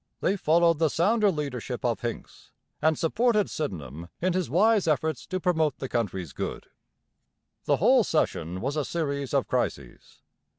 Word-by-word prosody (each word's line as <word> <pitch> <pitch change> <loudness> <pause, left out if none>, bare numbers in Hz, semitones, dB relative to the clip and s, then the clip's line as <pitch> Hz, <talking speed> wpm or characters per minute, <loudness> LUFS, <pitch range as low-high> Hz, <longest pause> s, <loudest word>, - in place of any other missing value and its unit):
They 195 - +1
followed 170 -2 +3
the 160 -2 +3
sounder 210 +7 +2
leadership 135 - -4
of 115 -2 0
Hincks 120 -1 -6 0.3
and 160 0 +3
supported 215 +5 +1
Sydenham 85 - -5
in 185 +1 +1
his 185 -5 -1
wise 205 - +3
efforts 155 -1 0
to 185 - -2
promote 160 -5 +1
the 135 - -5
country's 95 - -3
good. - - -5 1.0
The - - +2
whole - - +5
session 90 +4 -1
was 140 +3 -2
a 150 - 0
series 140 -5 -3
of - - +1
crises. - - -4
155 Hz, 155 wpm, -27 LUFS, 125-180 Hz, 1.0 s, whole